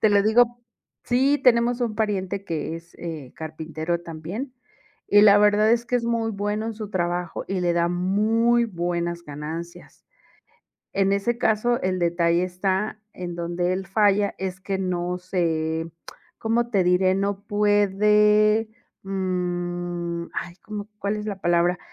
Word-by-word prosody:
Te 215 Hz, -, +5 dB
lo 200 Hz, -1 st, +4 dB
digo 240 Hz, +2 st, +3 dB, 0.5 s
Sí 270 Hz, +4 st, +3 dB
tenemos 240 Hz, 0 st, +4 dB
un 225 Hz, -3 st, -1 dB
pariente 200 Hz, -2 st, -2 dB
que 165 Hz, 0 st, -3 dB
es, 170 Hz, +1 st, -15 dB
eh, 155 Hz, -7 st, -7 dB
carpintero 160 Hz, +1 st, -4 dB
también, 175 Hz, -, -6 dB, 0.5 s
y 205 Hz, -, +6 dB
la 205 Hz, -1 st, +8 dB
verdad 210 Hz, +1 st, +4 dB
es 235 Hz, 0 st, +2 dB
que 245 Hz, +1 st, 0 dB
es 235 Hz, -, -2 dB
muy 230 Hz, -1 st, 0 dB
bueno 205 Hz, +1 st, -2 dB
en 225 Hz, -, -3 dB
su 215 Hz, -1 st, -7 dB
trabajo, 175 Hz, -2 st, -2 dB
y 190 Hz, -1 st, -2 dB
le 175 Hz, -1 st, +1 dB
da 170 Hz, 0 st, +2 dB
muy 215 Hz, +7 st, +2 dB
buenas 175 Hz, -3 st, -2 dB
ganancias. 160 Hz, +3 st, -8 dB, 0.9 s
En 195 Hz, 0 st, +2 dB
ese 200 Hz, +4 st, 0 dB
caso, 240 Hz, +2 st, +1 dB
el 185 Hz, 0 st, 0 dB
detalle 170 Hz, 0 st, +2 dB
está 190 Hz, +4 st, -2 dB
en 175 Hz, -1 st, -6 dB
donde 175 Hz, +1 st, -1 dB
él 190 Hz, 0 st, -4 dB
falla 205 Hz, 0 st, +3 dB
es 190 Hz, 0 st, -4 dB
que 190 Hz, 0 st, -3 dB
no 180 Hz, -1 st, -2 dB
se 165 Hz, -3 st, -1 dB, 0.5 s
¿Cómo 230 Hz, +1 st, 0 dB
te 195 Hz, -5 st, +2 dB
diré? 185 Hz, +1 st, +3 dB
No 200 Hz, 0 st, -1 dB
puede, 210 Hz, +1 st, +3 dB, 0.3 s
mm, 175 Hz, -2 st, -3 dB
ay, 175 Hz, 0 st, -4 dB
¿cómo 210 Hz, -1 st, -6 dB
cuál 200 Hz, +2 st, -1 dB
es 210 Hz, 0 st, -5 dB
la 200 Hz, -2 st, -4 dB
palabra? 175 Hz, 0 st, +2 dB
190 Hz, 150 wpm, -24 LUFS, 175-215 Hz, 0.9 s, la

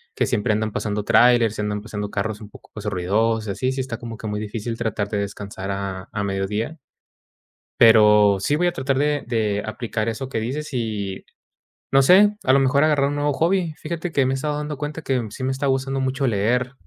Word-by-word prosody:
que -, -, +1 dB
siempre 110 Hz, -2 st, +1 dB
andan 110 Hz, 0 st, -1 dB
pasando 105 Hz, -1 st, -2 dB
tráilers, 115 Hz, 0 st, +4 dB
y -, -, -2 dB
andan 105 Hz, 0 st, -2 dB
pasando 105 Hz, -1 st, -5 dB
carros 105 Hz, +1 st, -3 dB
un 105 Hz, -, -10 dB
poco -, -, -16 dB, 0.2 s
ruidosos 110 Hz, +4 st, 0 dB
y -, -, -1 dB
así. 130 Hz, +6 st, -1 dB
Sí 130 Hz, -, -2 dB
está 125 Hz, -3 st, -5 dB
como 115 Hz, -1 st, -8 dB
que 110 Hz, -, -6 dB
muy 105 Hz, 0 st, -3 dB
difícil 110 Hz, +2 st, -4 dB
tratar 110 Hz, -3 st, -2 dB
de 105 Hz, -, -2 dB
descansar 100 Hz, -1 st, -5 dB
a 95 Hz, -1 st, -5 dB
a 100 Hz, -1 st, -3 dB
mediodía. 100 Hz, +9 st, -2 dB, 1.0 s
Pero 105 Hz, -3 st, +6 dB
sí 145 Hz, +9 st, +1 dB
voy 175 Hz, +3 st, +1 dB
a 175 Hz, -, -1 dB
tratar 130 Hz, +1 st, -1 dB
de 145 Hz, 0 st, +1 dB
de 110 Hz, -4 st, 0 dB
aplicar 110 Hz, 0 st, -3 dB
eso 115 Hz, +4 st, -4 dB
que 115 Hz, -, -2 dB
dices, 140 Hz, +6 st, -4 dB
y 105 Hz, -5 st, -3 dB, 0.7 s
no 135 Hz, 0 st, +6 dB
sé, 205 Hz, +8 st, +6 dB
a 130 Hz, -, +3 dB
lo 135 Hz, -, +5 dB
mejor 140 Hz, +2 st, +3 dB
agarrar 145 Hz, -3 st, +3 dB
un 145 Hz, -, -3 dB
nuevo 145 Hz, 0 st, +1 dB
hobby. 170 Hz, +1 st, 0 dB
Fíjate 170 Hz, +2 st, -4 dB
que 140 Hz, -4 st, +2 dB
me 130 Hz, -, 0 dB
he -, -, 0 dB
estado 145 Hz, +2 st, -2 dB
dando 150 Hz, 0 st, -4 dB
cuenta 150 Hz, +2 st, -5 dB
que 130 Hz, -4 st, -1 dB
sí 130 Hz, -, -6 dB
me 130 Hz, -, 0 dB
está 135 Hz, +2 st, -2 dB
gustando 135 Hz, 0 st, 0 dB
mucho 135 Hz, +1 st, 0 dB
leer, 120 Hz, +4 st, 0 dB
115 Hz, 215 wpm, -22 LUFS, 105-135 Hz, 1.0 s, Pero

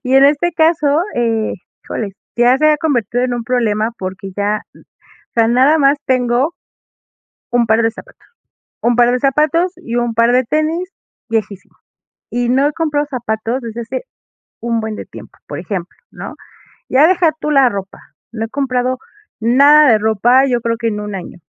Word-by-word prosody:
Y 260 Hz, 0 st, 0 dB
en 270 Hz, +1 st, +7 dB
este 300 Hz, +5 st, +2 dB
caso, 315 Hz, -2 st, +2 dB
eh, 225 Hz, -2 st, 0 dB, 0.3 s
híjole, 210 Hz, -3 st, -4 dB, 0.2 s
si 240 Hz, -, +1 dB
ya 250 Hz, +2 st, +4 dB
se 305 Hz, -, +3 dB
ha 305 Hz, -, +3 dB
convertido 245 Hz, -, 0 dB
en 250 Hz, -1 st, -1 dB
un 235 Hz, -1 st, -4 dB
problema 225 Hz, -3 st, 0 dB
porque 190 Hz, +1 st, -6 dB
ya, 205 Hz, +1 st, -1 dB
n -, -, -18 dB
o -, -, -30 dB
sea, 230 Hz, -1 st, +3 dB
nada 260 Hz, +6 st, +4 dB
más 280 Hz, 0 st, +3 dB
tengo 255 Hz, +3 st, +1 dB, 1.0 s
un 240 Hz, -1 st, +3 dB
par 220 Hz, +1 st, +3 dB
de 225 Hz, 0 st, +1 dB
zapato -, -, -14 dB, 0.7 s
un 240 Hz, 0 st, +2 dB
par 245 Hz, 0 st, +4 dB
de 250 Hz, -, +1 dB
zapatos 305 Hz, +7 st, +1 dB
y 250 Hz, -10 st, -6 dB
un 240 Hz, -1 st, -1 dB
par 230 Hz, +1 st, +3 dB
de 255 Hz, +1 st, +4 dB
tenis 310 Hz, +7 st, -1 dB, 0.4 s
viejísimo, 215 Hz, -3 st, -4 dB, 0.5 s
y 240 Hz, 0 st, -1 dB
no 270 Hz, +3 st, +3 dB
he 300 Hz, -, -3 dB
comprado 295 Hz, -2 st, -1 dB
zapatos 235 Hz, -1 st, -3 dB
desde 230 Hz, -1 st, -7 dB
hace 235 Hz, -, -5 dB, 0.6 s
un 235 Hz, -1 st, -1 dB
buen 220 Hz, -1 st, -4 dB
de -, -, -7 dB
tiempo, -, -, -13 dB
por -, -, -6 dB
ejemplo, 185 Hz, -4 st, -5 dB
¿no?, -, -, -8 dB, 0.6 s
ya 285 Hz, +5 st, +5 dB
deja 350 Hz, -3 st, +3 dB
tú 300 Hz, -, -2 dB
la 275 Hz, -4 st, +4 dB
ropa, 195 Hz, -2 st, -6 dB, 0.3 s
no 225 Hz, -1 st, -3 dB
he -, -, -5 dB
comprado 255 Hz, -2 st, -1 dB, 0.4 s
nada 280 Hz, +5 st, +6 dB
de -, -, +5 dB
ropa, 220 Hz, +5 st, +3 dB
yo 250 Hz, -3 st, 0 dB
creo 230 Hz, 0 st, -1 dB
que 230 Hz, 0 st, -2 dB
en 210 Hz, -1 st, -3 dB
1 210 Hz, -1 st, -6 dB
año, 180 Hz, -1 st, -8 dB
245 Hz, 185 wpm, -16 LUFS, 225-285 Hz, 1.0 s, en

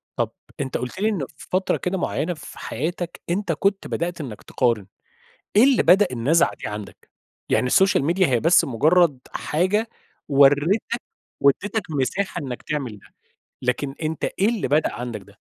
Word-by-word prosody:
طب -, -, -1 dB, 0.3 s
أنت 135 Hz, -2 st, -2 dB
قُلت 125 Hz, +9 st, -6 dB
لي 215 Hz, +2 st, +2 dB
إن 185 Hz, -10 st, -2 dB
في -, -, -12 dB
فترة 185 Hz, +1 st, +1 dB
كده 185 Hz, +1 st, -2 dB
مُعيّنة 175 Hz, 0 st, -1 dB
في 150 Hz, -, -11 dB
حياتك 170 Hz, +6 st, -4 dB
أنت 180 Hz, +1 st, 0 dB
كنت 195 Hz, +5 st, 0 dB
بدأت 170 Hz, -1 st, -3 dB
إنك 115 Hz, -7 st, -7 dB
تقارن، 115 Hz, -6 st, 0 dB, 0.7 s
إيه 215 Hz, -, +8 dB
اللي 270 Hz, -2 st, +4 dB
بدأ 195 Hz, +4 st, +6 dB
النزعة 135 Hz, +8 st, +2 dB
دي -, -, -7 dB
عندك؟ 105 Hz, -1 st, -9 dB, 0.4 s
يعني 125 Hz, -, +2 dB
السوشيال 190 Hz, +1 st, +3 dB
ميديا 175 Hz, +4 st, +3 dB
هي 125 Hz, -5 st, +1 dB
بس 165 Hz, +6 st, +5 dB
مجرد 150 Hz, +4 st, +3 dB
حاجة 190 Hz, +8 st, 0 dB, 0.4 s
وريتك 145 Hz, -, +3 dB, 0.4 s
واديتك 205 Hz, +10 st, +2 dB
مساحة 155 Hz, +7 st, -1 dB
إنك 125 Hz, -3 st, -6 dB
تعمل 130 Hz, -9 st, -4 dB
ده، -, -, -20 dB, 0.6 s
لكن 135 Hz, +2 st, -1 dB
أنت 155 Hz, 0 st, -2 dB
إيه 200 Hz, +3 st, +1 dB
اللي 230 Hz, -4 st, -1 dB
بدأ 150 Hz, +2 st, +2 dB
عندك 120 Hz, -3 st, -5 dB
ده؟ -, -, -19 dB
160 Hz, 160 wpm, -23 LUFS, 130-190 Hz, 0.7 s, إيه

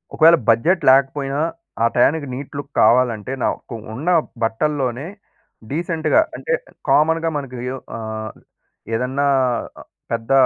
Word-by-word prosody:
ఒకవేళ 165 Hz, +1 st, +7 dB
బడ్జెట్ 165 Hz, +11 st, +3 dB
లేకపోయినా 135 Hz, +1 st, +2 dB, 0.4 s
ఆ -, -, +5 dB
టయానికి 140 Hz, +4 st, +3 dB
నీట్ 140 Hz, +2 st, -7 dB
లుక్ 145 Hz, 0 st, -7 dB
కావాలంటే, 120 Hz, 0 st, +3 dB
నాకు 120 Hz, -, -3 dB, 0.2 s
ఉన్న 150 Hz, +9 st, -3 dB, 0.3 s
బట్టల్లోనే 130 Hz, +2 st, -1 dB, 0.6 s
డీసెంట్‌గా 165 Hz, -, +1 dB, 0.2 s
అంటే 485 Hz, -, -2 dB, 0.4 s
కామన్‌గా 160 Hz, +4 st, +3 dB
మనకు 130 Hz, -3 st, -6 dB, 0.4 s
ఆహ్, 110 Hz, -1 st, -5 dB, 0.6 s
ఏదన్నా 130 Hz, +4 st, 0 dB, 0.8 s
పెద్ద 115 Hz, +2 st, -3 dB
135 Hz, 105 wpm, -20 LUFS, 120-155 Hz, 0.8 s, ఒకవేళ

